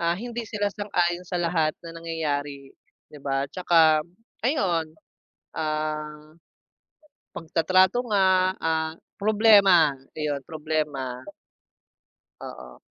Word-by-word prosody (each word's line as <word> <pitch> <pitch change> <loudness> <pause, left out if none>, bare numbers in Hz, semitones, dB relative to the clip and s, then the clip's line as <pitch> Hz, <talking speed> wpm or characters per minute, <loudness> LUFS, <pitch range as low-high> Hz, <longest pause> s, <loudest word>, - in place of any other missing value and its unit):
ah, 170 0 +1
hindi 240 +2 -5
sila 205 -2 -1
sang-ayon 175 -4 -1
sa 180 - -3
lahat 165 -2 +1
ng 165 0 -9
nangyayari, 145 -4 -4 0.4
'di 150 - -11
ba? 135 0 0
Tsaka 160 -4 +4 0.4
ayon, 180 - 0 0.7
ah, 155 -1 -4 1.0
pagtatrato 185 +7 +2
nga, 190 -2 +3
ah, 160 -1 -1 0.3
problema 200 -7 +5 0.2
iyun, 150 -2 -2
problema. 150 -6 -3 1.2
Oo. 65 -1 -10
165 Hz, 95 wpm, -25 LUFS, 150-185 Hz, 1.2 s, problema